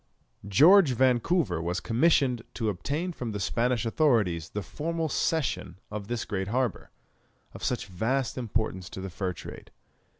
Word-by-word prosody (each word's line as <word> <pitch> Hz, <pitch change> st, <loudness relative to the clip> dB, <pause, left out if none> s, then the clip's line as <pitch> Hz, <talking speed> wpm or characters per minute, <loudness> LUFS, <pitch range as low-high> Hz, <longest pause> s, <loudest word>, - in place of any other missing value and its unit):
George 155 Hz, -, +6 dB
Vancouver 125 Hz, -, +2 dB
was 90 Hz, +2 st, -1 dB
commissioned 125 Hz, -, +2 dB
to 110 Hz, -3 st, -1 dB
obtain 145 Hz, -, -2 dB
from 120 Hz, -7 st, -5 dB
the 105 Hz, -, -3 dB
Spanish 120 Hz, +5 st, 0 dB
authorities 110 Hz, -, +2 dB
the 105 Hz, -, -4 dB
formal 165 Hz, -, -3 dB
cession 145 Hz, -, -1 dB
of 105 Hz, -1 st, -5 dB
this 120 Hz, 0 st, -3 dB
great 95 Hz, -2 st, -3 dB
harbour, 125 Hz, +2 st, -1 dB, 0.6 s
of -, -, -10 dB
such 125 Hz, -, -1 dB
vast 115 Hz, +7 st, -1 dB
importance 110 Hz, -6 st, -2 dB
to -, -, -8 dB
the 95 Hz, 0 st, -6 dB
fur 90 Hz, +1 st, -2 dB
trade. -, -, -10 dB
115 Hz, 145 wpm, -28 LUFS, 95-135 Hz, 0.6 s, George